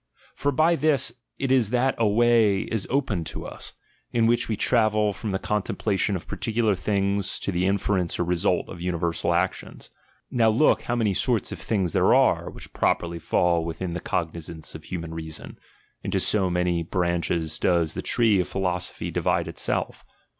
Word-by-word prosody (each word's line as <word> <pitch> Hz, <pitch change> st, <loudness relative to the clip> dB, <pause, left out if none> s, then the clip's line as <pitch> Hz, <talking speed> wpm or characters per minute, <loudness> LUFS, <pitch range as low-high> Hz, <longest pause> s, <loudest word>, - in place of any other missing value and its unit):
For 145 Hz, -, -1 dB
by 160 Hz, +5 st, +3 dB
this 140 Hz, -5 st, +1 dB, 0.2 s
it 135 Hz, -1 st, -1 dB
is 125 Hz, -6 st, +3 dB
that 125 Hz, +2 st, +2 dB
a 115 Hz, -, +3 dB
way 110 Hz, -2 st, +4 dB
is 110 Hz, -4 st, -3 dB
opened 115 Hz, -, -1 dB
to -, -, -6 dB
us, -, -, -7 dB, 0.4 s
in 115 Hz, -1 st, +2 dB
which 120 Hz, +1 st, +2 dB
we 110 Hz, -, 0 dB
travel 110 Hz, -2 st, +2 dB
from 110 Hz, +3 st, -5 dB
the 95 Hz, -, 0 dB
con 105 Hz, +2 st, -1 dB
templation 100 Hz, 0 st, -1 dB
of 90 Hz, -, -5 dB
particular 115 Hz, -2 st, 0 dB
things 100 Hz, +1 st, -1 dB
to -, -, -3 dB
the 90 Hz, +1 st, 0 dB
inference 95 Hz, -3 st, 0 dB
or -, -, +1 dB
result 90 Hz, +1 st, +1 dB
of 85 Hz, -, -9 dB
universal 85 Hz, -1 st, -1 dB
actions. 90 Hz, +2 st, -2 dB, 0.4 s
Now 115 Hz, -2 st, +3 dB
look, 110 Hz, -1 st, +3 dB
how 120 Hz, -, -2 dB
many 110 Hz, -4 st, +1 dB
sorts 115 Hz, +3 st, +1 dB
of -, -, -6 dB
things 95 Hz, -7 st, -1 dB
there -, -, +4 dB
are, -, -, +3 dB
which -, -, -11 dB
properly 85 Hz, 0 st, 0 dB
fall 85 Hz, 0 st, +1 dB
within 85 Hz, +2 st, -4 dB
the 90 Hz, -, -3 dB
cognizance 80 Hz, -1 st, -3 dB
of -, -, -10 dB
human 85 Hz, -3 st, -5 dB
reason; 80 Hz, -1 st, -7 dB, 0.4 s
into -, -, -1 dB
so 95 Hz, -3 st, +2 dB
many 90 Hz, -1 st, 0 dB
branches 85 Hz, -2 st, -1 dB
does 85 Hz, -3 st, +2 dB
the -, -, -4 dB
tree 110 Hz, -5 st, +3 dB
of 90 Hz, -, 0 dB
philosophy 90 Hz, -2 st, -2 dB
divide -, -, 0 dB
itself. -, -, -3 dB
95 Hz, 175 wpm, -25 LUFS, 85-115 Hz, 0.4 s, way